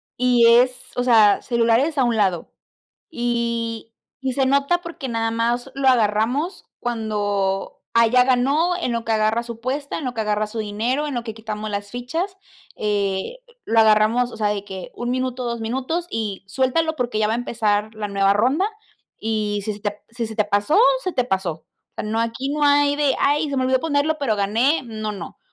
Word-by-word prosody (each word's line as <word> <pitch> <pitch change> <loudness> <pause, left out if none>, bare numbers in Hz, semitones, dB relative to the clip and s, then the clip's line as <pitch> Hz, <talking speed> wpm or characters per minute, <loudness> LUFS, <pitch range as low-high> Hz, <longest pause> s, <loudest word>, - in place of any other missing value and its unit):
y 245 -1 +4
es, 250 +2 +5 0.2
o 245 - 0
sea, 220 -5 +5
celulares 235 +5 +1
a 265 - +4
un 240 -2 +1
lado. 190 -6 0 0.6
Y 235 -3 -2 0.4
y 260 -1 -1
se 270 - +2
nota 280 +6 +2
porque 320 -6 -7
nada 225 -1 -1
más 240 +3 -1
lo 275 -1 +2
agarramos 245 - +1
cuando, 205 -4 -2
ah, 230 0 +6
ya 250 +2 +5
ganó, 275 +8 +2
en 340 -9 -2
lo 230 -1 -1
que 225 0 -2
agarra 220 +2 +2
su 235 0 -6
apuesta, 260 +5 -4
en 310 - -6
lo 250 - -2
que 225 - -4
agarra 210 0 0
su 220 +2 -7
dinero, 225 +7 -1
en 290 - -4
lo 240 -1 -3
que 220 - -5
quitamos 215 -1 -6
las 205 0 -4
fichas, 325 - -4 0.4
eh, 205 - -1 0.3
lo 225 - +1
agarramos, 220 +3 +4
o - - -10
sea, 210 -1 0
de 205 -1 -2
que 190 -3 -8
1 240 - -4
minuto, 255 0 -2
2 235 -1 -3
minutos, 265 +9 -2
y 205 -4 -3
suéltalo, 295 +7 0
porque 245 -4 -2
ya 215 -1 +2
va 220 - +1
a - - +1
empezar 220 -3 -1
la 210 -1 -4
nueva 200 0 +2
ronda, 260 - +2 0.5
y 210 -2 -1
si 215 - -2
se 205 - -10
te 205 - -1
p 205 - -15
si 235 0 -3
se 220 0 -8
te 210 - +2
pasó, 205 - +2 0.2
se 370 - -2
te 250 - +1
pasó. 190 -6 -1 0.4
O - - -51
sea, - - -4
no, 220 +2 -1
aquí 230 +4 -2
no 295 +1 -2
hay 285 0 +4
de: 285 -3 +2
"Ay, 295 +2 +2
se 275 - -2
me 260 - +1
olvidó 260 0 +2
ponerlo, 310 +1 0
pero 230 -7 0
gané, 230 +9 +2
no, 215 -2 -4
no". 190 -4 -9
235 Hz, 205 wpm, -22 LUFS, 215-265 Hz, 0.6 s, ah